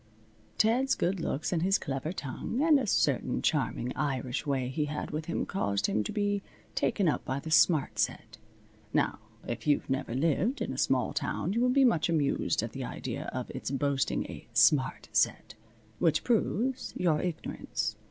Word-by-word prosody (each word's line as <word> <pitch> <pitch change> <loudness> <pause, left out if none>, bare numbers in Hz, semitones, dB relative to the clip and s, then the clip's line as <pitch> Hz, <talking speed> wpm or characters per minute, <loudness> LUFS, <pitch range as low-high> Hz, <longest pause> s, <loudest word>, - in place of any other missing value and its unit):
Ted's 250 +5 +3
good 185 +2 0
looks 155 +1 -2
and 165 - +1
his 195 +3 +3
clever 135 +3 -3
tongue 180 - -4
and 310 -3 +6
a 255 - -2
certain - - +1
charming 125 +2 0
Irish 135 -1 -2
way 135 -3 0
he 150 +4 -1
had 150 0 -4
with 155 +1 -3
him 170 - -2
caused 100 - -1
him 105 - +1
to - - -4
be 205 -1 0 0.3
taken 200 -4 +1
up 150 - +1
by 130 +1 -2
the 160 +3 -7
smart 145 -9 +4
set. 110 0 -2 0.6
Now, - - +1 0.3
if 120 +2 -4
you've 145 -2 +2
never 135 -3 -1
lived 165 - +1
in - - -2
a - - -6
small - - +1
town 190 - -1
you 230 - +1
will 250 - +3
be 270 +1 +5
much 170 -10 +3
amused 150 -4 +1
at - - -4
the - - -5
idea - - -5
of - - -4
its - - -5
boasting 140 0 0
a - - -9
smart 135 -3 +3
set. - - +1 0.5
Which 155 -2 +2
proves 245 +2 0
your 165 -4 +2
ignorance. 175 -3 -3
155 Hz, 180 wpm, -30 LUFS, 135-200 Hz, 0.6 s, and